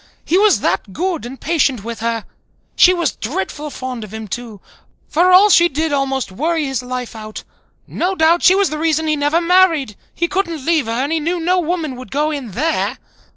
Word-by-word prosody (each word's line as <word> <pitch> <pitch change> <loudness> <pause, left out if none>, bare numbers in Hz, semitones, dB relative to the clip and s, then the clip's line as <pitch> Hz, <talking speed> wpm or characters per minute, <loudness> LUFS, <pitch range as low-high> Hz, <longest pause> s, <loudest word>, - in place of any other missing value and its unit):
He 340 - 0
was 415 +2 +4
that 195 - -1
good 345 - -2
and 265 +2 -10
patient 280 -8 0
with 230 0 -6
her. 230 -1 -2 0.5
She 360 - +6
was 345 -2 -1
dreadful 300 - -4
fond 255 -4 -6
of 210 - -10
him 220 0 -7
too, 225 0 -7 0.5
for 355 +4 +3
all 395 +3 +7
she 345 -1 +6
did 315 +1 -2
almost 270 -5 -1
worry 315 - -1
his 270 -2 -2
life 250 -1 -6
out. 215 -1 -8 0.4
No 375 +2 -2
doubt 330 +1 +3
she 370 - +6
was 395 -3 +2
the 305 - -4
reason 320 0 +1
he 310 -1 +1
never 295 +3 +1
married. 335 - +3 0.2
He 340 - 0
couldn't 335 -7 -2
leave 320 -7 +1
her - - -2
and 260 +6 -1
he 325 - +1
knew 340 +3 -2
no 360 +2 +1
woman 325 -5 -2
would 255 - -10
go 300 +2 0
in 265 -9 -6
there. 315 - -1
305 Hz, 205 wpm, -18 LUFS, 250-340 Hz, 0.5 s, all